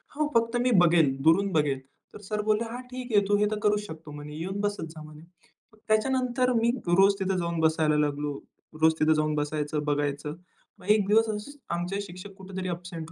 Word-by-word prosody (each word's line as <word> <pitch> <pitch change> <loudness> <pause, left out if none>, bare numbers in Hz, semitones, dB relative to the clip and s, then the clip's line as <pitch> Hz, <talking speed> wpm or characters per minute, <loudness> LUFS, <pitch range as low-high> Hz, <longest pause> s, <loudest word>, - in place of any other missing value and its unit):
हो 305 0 +1
फक्त 230 +1 +2
मी 250 0 +2
बघेल 165 -6 +4
दुरून 190 +6 +4
बघेल. 145 -4 +1 0.4
तर - - -9
सर 210 +1 -3
बोलले 215 +1 +1
हा 245 - -5
ठीक 250 -1 -6
आहे 205 - +5
तू 205 0 +3
हे 210 - +3
तर 215 - -2
करू 210 0 +3
शकतो 160 -2 -10
म्हणे 150 0 -8
येऊन 190 +5 -4
बसत 205 -5 -2
जा 160 -1 -11
म्हणे. 155 0 -13 0.5
मग - - -21
त्याच्यानंतर 250 +3 +1
मी 230 0 +2 0.2
रोज 195 +3 +5
तिथं 190 -1 0
जाऊन 170 -1 -2
बसायला 160 -1 +2
लागलो. 145 -1 -1 0.4
रोज 160 0 +5
तिथं 155 +1 +4
जाऊन 155 0 0
बसायचं 150 0 -2
बघायचं. 145 0 -1 0.4
मग - - -15
एक 210 -1 +4
दिवस 220 +2 +4
असे 210 +5 -4 0.2
आमचे 175 +3 -3
शिक्षक 190 +1 -9
कुठेतरी 190 -1 -6
अबसेन्ट 170 -2 -6
180 Hz, 195 wpm, -27 LUFS, 155-210 Hz, 0.5 s, आहे